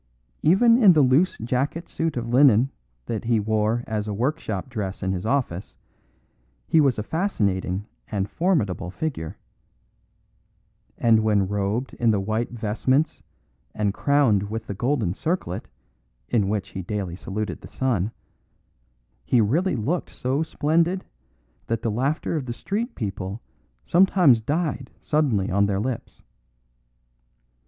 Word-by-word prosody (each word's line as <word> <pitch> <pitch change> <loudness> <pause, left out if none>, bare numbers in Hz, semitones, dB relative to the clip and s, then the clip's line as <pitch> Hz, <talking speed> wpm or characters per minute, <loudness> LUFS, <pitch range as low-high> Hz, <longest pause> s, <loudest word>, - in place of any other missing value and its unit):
Even 230 +9 +5
in 195 -5 +8
the 150 -3 +5
loose 135 +8 +3
jacket 130 +8 -2
suit 165 -4 -2
of 120 -1 -3
linen 125 0 +5 0.3
that 115 0 -4
he 115 -1 +2
wore 110 +2 0
as 110 -1 -3
a 105 - -2
workshop 120 - -2
dress 105 -8 -4
in 95 - 0
his 95 +2 -3
office 115 -9 -2 0.9
he 160 - +5
was 135 -4 +2
a 105 - -2
fascinating 100 - -1 0.2
and 100 -1 -2
formidable 115 - 0
figure; 95 - -4 1.6
and 115 -1 +4
when 105 -3 +2
robed 105 +5 -2
in 120 - +3
the 105 -2 +3
white 110 +4 -1
vestments 120 +6 0 0.5
and 105 -2 0
crowned 115 -9 +2
with 110 +1 -4
the - - -4
golden 120 -3 0
circlet, 155 - -3 0.6
in 105 -4 +2
which 105 -2 -2
he 95 - -5
daily 95 -2 -4
saluted 105 +3 -4
the - - -10
sun, 115 -6 -1 1.1
he 120 - +2
really 150 - +2
looked 140 +10 -1
so 130 +3 -1
splendid 165 +4 +1 0.6
that 115 - -2
the 115 - 0
laughter 135 +9 -1
of 140 -5 -3
the 120 - -3
street 215 - -3
people 100 -2 -4 0.5
sometimes 175 - +5
died 145 0 -2
suddenly 130 - +1
on 100 +2 +3
their 100 -1 0
lips. 120 +2 -5
115 Hz, 135 wpm, -24 LUFS, 105-145 Hz, 1.6 s, in